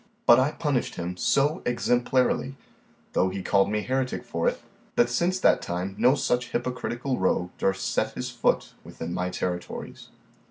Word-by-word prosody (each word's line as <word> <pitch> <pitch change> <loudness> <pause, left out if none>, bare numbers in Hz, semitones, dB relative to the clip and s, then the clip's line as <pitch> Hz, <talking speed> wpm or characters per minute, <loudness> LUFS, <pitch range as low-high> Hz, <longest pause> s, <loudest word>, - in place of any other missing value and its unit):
But 120 +1 +8
I 140 +4 +2
punished 145 -6 -1
him 90 +1 -4
so 145 - +2
exemplarily, 125 +2 +1 0.6
though 95 - +2
he 95 0 -5
called 100 +1 +3
me 105 0 0
heretic 130 0 -1
for - - -1
it, - - -6 0.4
that 120 0 +3
since 175 +9 +1
that - - +4
time 90 +3 -3
no 125 +6 +4
such 125 -3 0
hypocritical 125 +1 -2
rogue 90 -1 +1
durst 95 0 0
set - - 0
his - - -4
foot - - 0
within 85 +1 -6
my 90 0 -1
territories. 90 -1 -5
120 Hz, 160 wpm, -26 LUFS, 95-130 Hz, 0.6 s, But